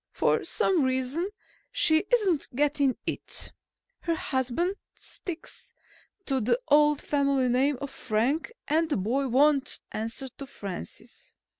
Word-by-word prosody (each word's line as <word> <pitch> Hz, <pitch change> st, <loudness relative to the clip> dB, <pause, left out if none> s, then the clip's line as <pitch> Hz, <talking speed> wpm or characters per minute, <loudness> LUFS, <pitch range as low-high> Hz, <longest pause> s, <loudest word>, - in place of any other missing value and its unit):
For -, -, +2 dB
some 370 Hz, -5 st, +2 dB
reason 260 Hz, +7 st, 0 dB, 0.4 s
she 320 Hz, -9 st, +3 dB
isn't 395 Hz, -, +3 dB
getting 285 Hz, -1 st, +2 dB
it. -, -, -4 dB, 0.5 s
Her 335 Hz, -1 st, -1 dB
husband 265 Hz, +6 st, 0 dB, 0.2 s
sticks 350 Hz, -3 st, -9 dB, 0.5 s
to 270 Hz, -2 st, +1 dB
the 250 Hz, -, +2 dB
old 295 Hz, 0 st, +5 dB
family 280 Hz, -3 st, +2 dB
name 265 Hz, +3 st, +2 dB
of 280 Hz, -1 st, -5 dB
Frank 250 Hz, -, 0 dB, 0.2 s
and 315 Hz, +2 st, +2 dB
the 295 Hz, -, +1 dB
boy 245 Hz, +8 st, 0 dB
won't 280 Hz, +2 st, +3 dB
answer 225 Hz, +5 st, -3 dB
to 275 Hz, -, -6 dB
Francis. 195 Hz, -, -9 dB
280 Hz, 125 wpm, -28 LUFS, 255-315 Hz, 0.5 s, old